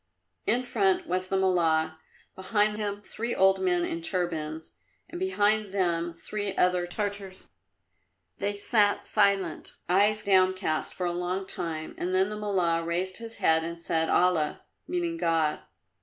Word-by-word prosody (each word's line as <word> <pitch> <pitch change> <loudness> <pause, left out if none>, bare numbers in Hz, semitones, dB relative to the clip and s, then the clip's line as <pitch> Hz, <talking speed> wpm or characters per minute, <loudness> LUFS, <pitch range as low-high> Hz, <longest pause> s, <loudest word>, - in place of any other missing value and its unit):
In 245 +4 +2
front 200 -6 +1
was 185 +1 -1
the 195 - +1
Mullah, 165 -4 +2 0.4
behind 210 +2 +1
him 205 -1 -3
three 235 +3 -4
old 190 0 +4
men 355 -2 +2
in 335 -1 -4
turbans, 160 - -3 0.4
and 340 +1 -7
behind 215 - +1
them 175 -3 0
three 200 +3 -5
other 180 -1 +2
Tartars. 200 0 -4 0.9
They 205 0 -1
sat 205 0 +2
silent, 195 -5 +1
eyes 205 +4 +3
downcast, 185 -4 +2
for 180 - -4
a 175 - -1
long 180 +2 -2
time, 160 -4 -5
then 185 +2 +1
the 210 - -4
Mullah 180 -5 0
raised 180 +3 -2
his 230 -1 -8
head 160 0 +3
and 170 +1 -5
said, 165 -1 0
"Allah!" 175 -4 +2 0.2
(meaning 345 -2 -2
God). 165 - +1
190 Hz, 140 wpm, -28 LUFS, 170-210 Hz, 0.9 s, old